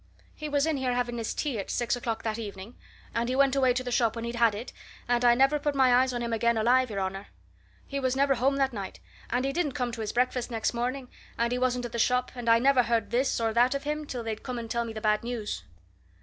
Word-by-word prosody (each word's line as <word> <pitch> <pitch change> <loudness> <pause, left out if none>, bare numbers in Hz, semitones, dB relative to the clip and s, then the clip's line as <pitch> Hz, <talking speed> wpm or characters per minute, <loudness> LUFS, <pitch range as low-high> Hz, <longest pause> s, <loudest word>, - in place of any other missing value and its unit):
"He 305 0 -6
was 285 0 +2
in 320 -2 0
here 255 -2 0
having 240 -1 -1
his 225 - -2
tea 275 -8 -2
at 195 - -5
six 240 0 0
o'clock 230 -2 -3
that 220 0 -2
evening, 205 +1 -7 0.4
and 235 +1 -1
he 255 - 0
went 275 0 +3
away 260 -2 +4
to 255 - -1
the 250 - -4
shop 235 -2 +2
when 230 0 -4
he'd 235 - -4
had 235 -3 +3
it, 225 +5 -7 0.3
and 240 0 +1
I 240 -1 +6
never 270 +4 +3
put 290 0 -1
my 260 -2 +5
eyes 255 +1 +4
on 240 -1 -3
him 235 -1 -2
again, 235 +1 +2
alive, 250 +3 +3
your 200 -2 -3
honour. 195 +1 -3 0.6
He 280 - -4
was 260 -1 0
never 275 0 +3
home 270 +2 +1
that 270 -2 +1
night, 195 -3 -6 0.3
and 250 +2 0
he 275 - -1
didn't 305 -4 0
come 250 -1 -2
to 230 -1 -6
his 215 - -2
breakfast 250 0 0
next 225 -1 -1
morning, 250 +2 -2 0.3
and 235 0 +1
he 250 - 0
wasn't 250 -1 0
at 240 - -6
the 235 - -3
shop 250 +2 +2
and 240 -2 -3
I 230 - +7
never 260 +1 +4
heard 230 -3 0
this 255 +2 +1
or 225 -1 0
that 245 +4 +3
of 275 - -3
him 300 0 -3
till 245 -4 -4
they 225 -1 -2
come 250 +3 -6
and 230 -1 -6
tell 235 0 0
me 225 - -6
the 215 - -6
bad 215 0 +2
news." 235 -3 -4
245 Hz, 275 wpm, -28 LUFS, 230-260 Hz, 0.6 s, I